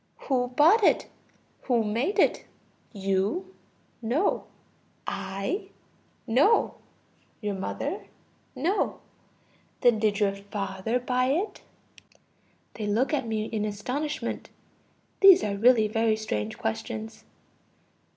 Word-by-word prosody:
Who 250 -3 0
bought 320 - +5
it? - - +4 0.6
Who 240 -3 +2
made 235 - -1
it? - - +3 0.5
You? 200 - -1 0.5
No. 255 - 0 0.6
I? 195 - -3 0.6
No. 275 - +3 0.6
Your 210 -3 -2
mother? 190 0 -4 0.5
No. 335 +11 0 0.8
Then 240 -3 +4
did 210 -1 +1
your 200 -2 +2
father 200 +3 -3
buy 250 0 0
it? 340 +11 -1 1.1
(They 215 -2 -4
look 235 +9 +1
at 270 -5 0
me 215 -1 -1
in 220 -2 -2
astonishment; 250 +9 -3 0.7
these 385 -2 +8
are 200 -1 -1
really 225 +1 +5
very 225 +1 +1
strange 110 - -3
questions.) 110 0 -4
225 Hz, 100 wpm, -27 LUFS, 205-270 Hz, 1.1 s, these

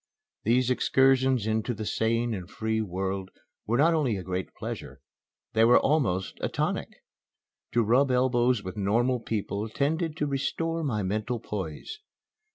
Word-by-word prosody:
These 125 +3 +2
excursions 130 -2 +3
into 110 +2 -1
the 110 - -5
sane 115 +2 0
and 95 -3 -6
free 110 +1 -1
world 95 -1 -3 0.4
were 115 +2 +2
not 160 +5 +4
only 135 -10 +1
a 95 - -6
great 95 +1 -3
pleasure, - - -6 0.5
they 110 - +4
were 120 +2 +7
almost 120 - 0
a - - 0
tonic. - - -3 0.7
To 120 - +3
rub 125 +6 +3
elbows 125 -2 +2
with 95 +1 -6
normal 120 +6 +1
people 110 -1 -3
tended 155 +6 -1
to 150 - 0
restore 165 +4 -1
my 110 -8 -1
mental 110 +5 -2
poise. 100 - -6
115 Hz, 150 wpm, -27 LUFS, 105-130 Hz, 0.7 s, were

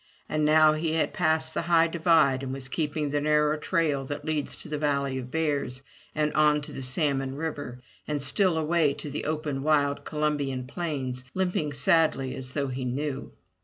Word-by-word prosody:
And 155 0 0
now 155 0 +6
he 155 +1 -1
had 160 - +1
passed 160 0 +2
the - - -1
high 165 0 +4
divide 165 -5 +3
and 135 -1 -4
was 135 0 -6
keeping 150 0 -2
the 145 0 0
narrow 150 0 +3
trail 155 -3 0
that 145 +2 -5
leads 155 -2 -2
to - - -11
the 150 -1 -3
valley 140 -3 0
of 125 -1 -7
bears 140 -4 -1 0.3
and 150 -1 0
on 150 -1 +4
to 145 - -7
Salmon 135 0 -1
River, 145 -5 -5 0.3
and 150 -1 -1
still 165 +5 +1
away 160 -2 +2
to 150 - -7
the 145 - -4
open 150 -3 -2
wild 145 -1 +2
Columbian 145 -4 -1
Plains, 130 -4 -4
limping 180 -6 0
sadly 140 -2 +2
as 130 0 -7
though 140 -2 -1
he 130 0 -4
knew. 135 +2 -3
150 Hz, 180 wpm, -27 LUFS, 135-155 Hz, 0.3 s, now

